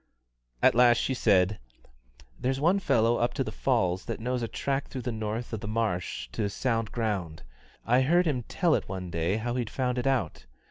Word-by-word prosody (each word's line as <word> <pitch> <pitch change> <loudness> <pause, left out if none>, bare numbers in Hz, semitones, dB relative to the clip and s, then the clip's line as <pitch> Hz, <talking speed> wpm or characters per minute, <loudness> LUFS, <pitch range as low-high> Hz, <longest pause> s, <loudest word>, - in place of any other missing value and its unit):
At - - +6
last 120 -1 +5
she 130 - 0
said: 100 -5 +2 0.8
"There's 130 +1 -1
one 175 +7 +3
fellow 115 - +2
up 120 - 0
to 135 - 0
the - - -5
falls 95 -9 0
that - - -4
knows 125 +2 -2
a 115 - -1
track 135 +4 -2
through 130 -2 -6
the 125 - -2
north 110 +2 -4
of 110 - -2
the 105 - -6
marsh 105 - -2
to 100 - -2
sound 115 0 -1
ground; 100 - -3 0.4
I 125 +3 +4
heard 175 +7 +3
him 140 -6 0
tell 170 -3 +1
it - - -1
one 90 -2 -5
day 85 +4 0
how 120 +2 -2
he'd 120 -3 -2
found 125 -1 -1
it 125 - -1
out. 95 - -1
115 Hz, 200 wpm, -28 LUFS, 105-130 Hz, 0.8 s, At